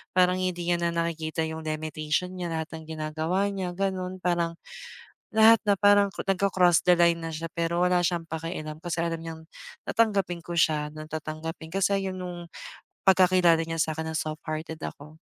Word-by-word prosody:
parang 180 0 +4
hindi 185 -1 -1
niya 175 0 +2
na 170 0 -1
nakikita 160 -1 -1
yung 160 0 -6
limitation 155 +3 -2
niya, 175 - -2
lahat 160 -1 -3
ng 160 -1 -9
ginagawa 160 +6 -1
niya 185 -2 -3
ganun. 185 -1 -2
Parang, 170 -1 0 0.8
lahat 220 +1 +7
na 200 - +5
parang 205 0 +6
cro - - -6
nagko-cross 185 -3 +3
the 180 - +6
line 170 -1 +4
na 165 - -4
siya, 165 +1 -4
pero 170 0 -1
wala 180 0 +3
siyang 170 -1 0
pakialam, 155 -1 -5
kasi 170 -1 -2
alam 165 -1 -2
niyang 160 -1 -7 0.5
tatanggapin 200 -6 +1
ko 175 - -6
siya 150 -2 +2
ng 155 0 -9
tatanggapin, 160 +1 -5
kasi 195 0 +1
'yan 185 0 -5
nung 175 -1 -6 0.6
pagkakilala 180 -3 +5
niya 165 -1 -2
sa 155 0 0
'kin 160 - -3
na - - -4
soft-hearted 155 +1 -4
ako. 150 +2 -8
170 Hz, 175 wpm, -27 LUFS, 160-185 Hz, 0.8 s, lahat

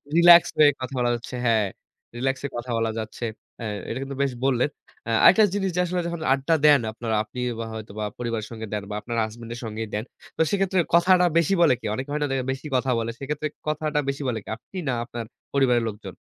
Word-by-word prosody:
Relax 170 0 +8
হয়ে 150 -1 +7
কথা 130 +2 -5
বলা 120 0 +2
যাচ্ছে। 120 +2 -8
হ্যাঁ, 110 -3 +3 0.5
রিল্যাক্সে 135 +2 -1
কথা 120 +1 -6
বলা 115 -1 0
যাচ্ছে। 110 +2 -6 0.4
হ্যাঁ, 110 -2 -3 0.2
এটা 115 - -3
কিন্তু 135 0 -6
বেশ 135 - 0
বললেন। 130 +1 +2 0.4
আ - - -3
আরেকটা 215 +4 +8
জিনিস, 195 -2 0
যে 180 - 0
আসলে 180 0 -1
যখন 170 -1 -4
আড্ডা 140 +4 +1
দেন 145 -2 +7
আপনারা। 115 -1 -3
আপনি 125 - -9 0.2
বা 115 - -3
হয়তো 110 -2 -7
বা 105 - -1
পরিবারের 115 -3 -3
সঙ্গে 110 -1 -6
দেন, 105 -1 -2
বা 105 - -4
আপনার 120 +3 -5
হাসব্যান্ডের 115 +2 -7
সঙ্গেই 110 0 -4
দেন। 105 +1 -1 0.3
তো - - +1
সেক্ষেত্রে, 195 -2 +1 0.2
কথাটা 180 +1 +5
বেশি 175 +4 +3
বলে 165 -6 +6
কে? - - -9
অনেকে 130 +3 -5
হয় 150 +1 -1
না, - - +1
যে - - +1 0.2
বেশি 135 +3 -5
কথা 130 +1 +1
বলে। 115 0 -2
সেক্ষেত্রে, 150 +2 -3 0.2
কথাটা 155 0 0
বেশি 140 +1 -3
বলে 115 -3 -1
কে? - - -12
আপনি, 185 - -12
না 125 - +1
আপনার 120 -2 -6 0.3
পরিবারের 125 -4 +3
লোকজন? 105 -4 -7
130 Hz, 220 wpm, -24 LUFS, 115-150 Hz, 0.5 s, Relax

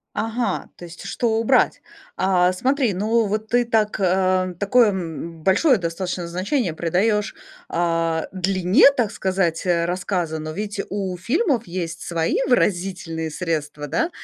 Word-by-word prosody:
Ага, 225 +3 -2
то - - -11
есть 170 +2 -11
что 225 +2 0
убрать? 240 +3 +2 0.3
А, 185 -1 +3
смотри, 255 +2 +1
ну 220 +4 +1
вот 215 +2 -2
ты 245 +1 +2
так, 220 -2 +1
а, 185 -1 +1
такое, 225 +4 +4
м, 165 -3 -6
большое 255 - +4
достаточно 175 0 -3
значение 185 - -1
придаешь, 205 +6 0 0.4
а, 165 -1 0
длине, 185 - +4
так 225 -5 0
сказать, 185 -3 -1
э, 170 -2 +2
рассказа. 175 -2 -2
Но 155 0 -5
ведь 205 +4 -4
у 190 -2 -3
фильмов 240 - 0
есть 170 -2 -4
свои 165 -1 -1
выразительные 175 -8 0
средства, 150 -3 -3
да, 325 - 0
185 Hz, 140 wpm, -22 LUFS, 170-215 Hz, 0.4 s, такое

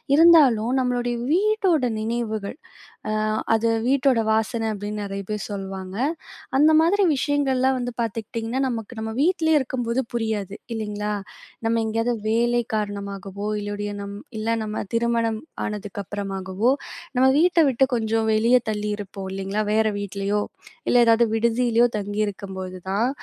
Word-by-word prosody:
இருந்தாலும் 285 -9 +6
நம்மளுடைய 245 -1 0 0.2
வீட்டோட 385 -5 +2 0.2
நினைவுகள், 220 0 -3 0.5
அ - - 0 0.4
அது 225 +1 +1 0.2
வீட்டோட 265 -2 +3
வாசன 225 +1 0
அப்பிடின்னு 205 +1 -4
நெறைய 200 0 -4
பேர் 210 -3 -3
சொல்வாங்க. 190 -1 -6 0.7
அந்த 305 +2 +6
மாதிரி 390 +5 +3
விஷயங்கள்லாம் 265 -2 +1
வந்து 245 0 -3
பாத்துக்கிட்டிங்கன்னா 225 +3 -3
நமக்கு 230 -1 -5
நம்ம 220 0 -4
வீட்லேயே 320 -1 +3
இருக்கும்போது 245 -1 -1
புரியாது 215 -4 -2 0.2
இல்லங்களா? 210 -1 -3 0.5
நம்ம 230 0 +2
எங்கேயாவது 230 +2 0 0.2
வேலை 240 +2 +2
காரணமாகவோ 200 -1 -4
இல்லையோடிய, 205 0 -4
நம்ம 200 0 -6 0.2
இல்ல 215 +1 -2
நம்ம 215 0 -3
திருமணம் 230 -1 +1 0.2
ஆனதுக்கு 205 -1 -5
அப்புறமாகவோ 195 +2 -2 0.5
நம்ம 255 +1 +4
வீட்ட 345 +2 +4
விட்டு 265 0 +3
கொஞ்சம் 225 -1 +1
வெளியே 230 +4 +4
தள்ளியிருப்போம் 205 -2 -4
இல்லங்களா, 195 +2 -2
வேற 220 0 +3
வீட்லயோ 200 +1 -1 0.5
இல்ல, - - +2
ஏதாவது 230 +1 +5
விடுதியிலேயோ 235 +1 +3
தங்கியிருக்கும்போது 195 -2 -4
தான் 215 +6 +1
225 Hz, 125 wpm, -23 LUFS, 205-245 Hz, 0.7 s, இருந்தாலும்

